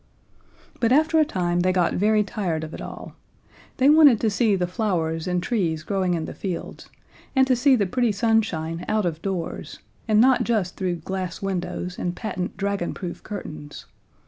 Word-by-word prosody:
But 230 0 +2
after 315 +4 +4
a 310 - +5
time 175 -6 -1
they 185 +1 +2
got 180 -2 +1
very 210 +2 +3
tired 180 -6 -3
of 160 - -7
it - - -7
all: - - -8 0.6
They 260 - +4
wanted 295 -6 +7
to 220 - +2
see 215 -1 +2
the 180 -2 0
flowers 175 -4 -1
and 180 -1 0
trees 170 -10 -1
growing 185 0 0
in 160 -1 -3
the - - -7
fields, 185 -4 -6 0.5
and 265 0 +5
to 260 -1 +3
see 265 +2 +4
the 210 -5 +1
pretty 240 +4 +1
sunshine 195 -7 0
out 215 -2 +1
of 165 -2 -2
doors, 185 -4 -4 0.3
and 215 -1 +4
not 255 +2 +5
just 210 -6 0
through 185 -2 -1
glass 190 -1 -4
windows 180 -1 -3
and 175 0 -2
patent 185 -5 -4
dragonproof 195 -3 -3
curtains. 155 -8 -8
190 Hz, 175 wpm, -24 LUFS, 175-225 Hz, 0.6 s, wanted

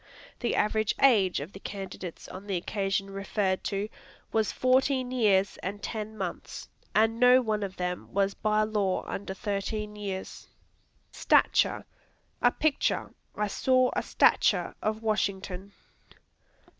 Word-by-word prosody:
The 240 - 0
average 215 0 +1
age 205 -9 +5
of 155 +7 -8
the 195 - -9
candidates, 190 -3 -7
on 195 +2 -9
the 195 - -1
occasion 195 +1 -2
referred 195 -1 -1
to, 200 +1 -1 0.4
was 220 -1 +1
fourteen 255 0 +2
years 205 -5 +2
and 200 +2 -4
ten 220 -1 -5
months, 190 -3 -5 0.3
and 225 +1 +3
no 250 +1 +7
one 215 -4 -1
of 195 -2 -4
them 180 0 -4
was 195 0 +1
by 215 0 +1
law 210 -3 0
under 190 -1 -5
thirteen 210 +1 -3
years. 195 -2 -6 0.6
Stature - - +3 0.6
A - - +6
picture; 310 -2 0 0.2
"I 210 - 0
saw 255 +5 +2
a - - +1
stature - - +3
of 215 +1 -2
Washington." 200 -3 -2
205 Hz, 130 wpm, -28 LUFS, 195-220 Hz, 0.6 s, no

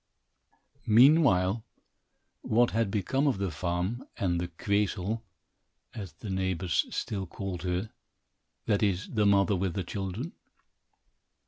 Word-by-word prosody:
Meanwhile, 115 - +5 0.8
what 120 +2 +3
had 115 -2 +1
become 130 +9 0
of 135 - +2
the 95 -2 -2
farm 90 - -2
and 85 -3 0
"the 90 - -2
Queezel," 100 +4 -1 0.7
as 100 -9 -7
the 100 +6 -9
neighbors 95 -2 0
still 95 -3 -3
called 95 0 -5
her 90 +4 -2 0.7
that 105 -3 +1
is, 95 -3 0
the 105 -2 +3
mother 100 +1 +4
with 90 -2 -1
the 95 - -1
children. 100 - -4
100 Hz, 120 wpm, -29 LUFS, 90-110 Hz, 0.8 s, Meanwhile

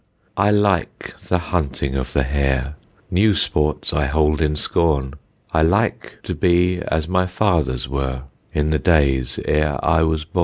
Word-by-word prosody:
I 100 +1 +2
like 105 -3 0
the 90 - +2
hunting 70 -6 -2
of 65 -1 -3
the 70 - +1
hare; 70 0 -1 0.4
New 100 +3 +3
sports 75 -2 0
I 75 -2 +1
hold 75 +1 +1
in 75 -1 +1
scorn. 75 -3 0 0.4
I 80 - +3
like 100 +8 0
to - - -4
be 90 0 +2
as 80 0 -1
my 90 0 +1
fathers 85 -11 0
were, 65 -1 -3 0.3
In 75 +1 0
the 75 - +1
days 65 -5 +1
e'er 75 -2 +1
I 80 0 +3
was 80 -1 0
born. 90 - -4
75 Hz, 160 wpm, -20 LUFS, 70-90 Hz, 0.4 s, New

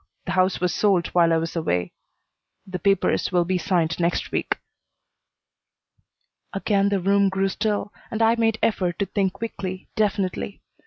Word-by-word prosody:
The - - -3
house 185 0 +2
was 180 -2 0
sold 190 -4 +2
while 170 -2 +3
I 165 - +4
was 165 +1 -3
away. 90 - -1 0.7
The 185 -1 -5
papers 195 +1 +1
will 175 -1 +2
be 185 +1 0
signed 170 -3 0
next 170 0 0
week." - - -1 2.0
Again 200 0 +1
the 200 -1 +1
room 200 +1 +3
grew 190 0 0
still 205 0 -2 0.2
and 220 - -3
I 225 0 +5
made 225 -1 +1
effort 180 -6 +1
to 200 - 0
think 195 -2 0
quickly, 190 -4 -6
definitely. 195 - -1
190 Hz, 155 wpm, -24 LUFS, 175-200 Hz, 2.0 s, I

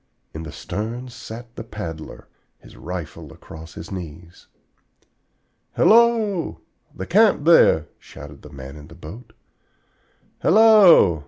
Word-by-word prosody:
In 80 - -7
the 80 - -8
stern 115 +7 -6
sat 120 -1 -11
the 115 - -7
paddler, 85 -8 -9 0.3
his - - -18
rifle 80 -3 -8
across 80 +1 -13
his 80 - -10
knees. 85 -2 -10 1.3
"Hello, 220 -6 +2 0.3
the 95 - -7
camp 205 - +3
there!" 80 - +5
shouted 75 0 -13
the 75 - -13
man 70 0 -11
in 75 0 -13
the 80 - -15
boat. 90 +9 -12 1.1
"Hello!" 190 - +6
95 Hz, 115 wpm, -21 LUFS, -, 1.3 s, Hello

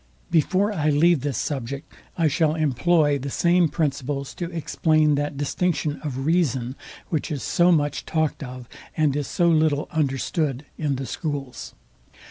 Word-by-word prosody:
Before 185 +6 +2
I 155 -5 +1
leave 155 +1 +4
this 140 -4 -2
subject 140 +1 -4 0.2
I 165 -2 +3
shall 155 +1 +2
employ 150 0 +2
the 140 +2 -4
same 170 +3 +3
principles 140 -3 -2
to 175 -2 -5
explain 155 -2 +2
that 145 0 -1
distinction 150 +1 -1
of 135 -3 -4
reason, 135 -7 +1 0.3
which 160 -1 -1
is 140 -5 -3
so 175 +1 +3
much 145 -3 +1
talked 155 -2 0
of, 125 -2 -8 0.3
and 150 -3 +2
is 145 -2 -2
so 175 - +1
little 155 -3 +2
understood, 145 -1 -1
in 145 -3 -1
the 135 +1 -4
schools. 140 0 -5
150 Hz, 150 wpm, -24 LUFS, 140-160 Hz, 0.3 s, leave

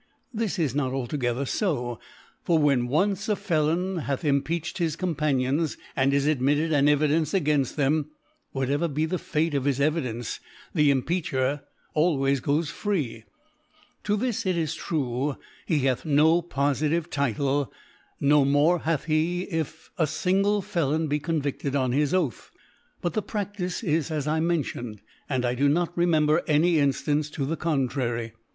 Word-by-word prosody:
This 220 -3 -2
is 155 -8 0
not 135 -2 -1
altogether 130 0 -1
fo: 125 - -1 0.4
For 170 - +3
when 140 -5 +3
once 195 - 0
a 210 - +3
Felon 170 +2 0
hath 140 -1 -3
Impeach 150 +4 0
ed - - -8
his 165 -3 0
Companions, 150 -3 0 0.2
and 135 0 +2
is 140 0 +2
admitted 150 +2 +2
an 145 -1 +4
Evi 150 +1 +4
dence 155 0 +1
againfl: 150 -7 +1
them, 150 +1 +1 0.5
whatever 140 +5 0
be 155 +1 -1
the 175 +2 -2
Fate 155 +1 -1
of 140 -2 0
his 140 -2 +1
Evidence, 130 -6 -1 0.3
the 150 -1 +4
Impeacher 140 -1 0 0.3
always 140 -4 +2
goes 150 +4 0
free. 145 - -2 0.8
To 210 0 +1
this, 240 0 -1
it 185 -2 +1
is 160 -2 -1
true, 135 -3 -2 0.3
he 155 -5 +2
hath 130 -2 +1
na 160 +3 +4
fofitive 155 +1 0
Title, 140 +1 0 0.5
no 145 0 +4
more 145 +5 +3
hath 160 -2 -1
he, 165 +3 0
if 160 -1 -4
a 160 - +3
fingle 195 +5 +1
elon 155 -1 +1
be 150 +1 +1
convicted 145 -3 -2
on 130 -3 +1
his 145 +3 +1
Oath. 170 - -1 0.5
But 175 - -1
the 215 - 0
Praftice 205 -2 -4
is 160 -4 0
as 150 -3 -2
I 155 +1 +1
mention, 145 -10 -2 0.3
and 130 -3 0
I 120 - +1
do 140 +3 +2
not 170 +3 0
re 175 0 +2
member 155 0 +3
any 160 +2 +3
Inftance 145 +1 +1
to 140 - -2
the 160 +4 -1
contrary. 130 -7 -1
150 Hz, 160 wpm, -26 LUFS, 140-165 Hz, 0.8 s, an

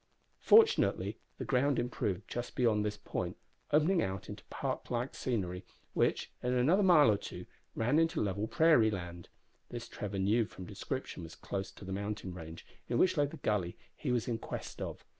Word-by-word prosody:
Fortunately 450 +1 +4 0.2
the - - -4
ground 135 +1 +2
improved 105 -5 -2
just 120 0 -5
beyond 110 -4 +3
this 105 -1 -2
point, 105 - -4 0.3
opening 165 +4 +4
out 95 0 -3
into - - -8
park - - -4
like 125 +2 -2
scenery, 95 -7 -2 0.3
which, - - +1
in 125 0 0
another 145 +11 +4
mile 165 - +7
or 105 - +2
two, - - -8 0.3
ran 125 +8 +2
into 165 0 +2
level 100 +1 -1
prairie 155 -7 +5
land. 85 -4 -6 0.4
This 120 -1 -6
Trevor 100 -1 -5
knew 105 +4 +3
from 95 -3 -10
description - - -5
was 80 -1 -9
close 95 -1 -4
to - - -11
the 95 - -4
mountain 100 -1 -4
range, 80 -2 -9 0.2
in 120 - +1
which 185 +5 +4
lay 145 -2 +3
the - - -9
gully 95 -5 -1 0.2
he 135 - -2
was 120 -2 0
in 115 -2 -1
quest - - -6
of. - - -5
110 Hz, 180 wpm, -33 LUFS, 95-140 Hz, 0.4 s, mile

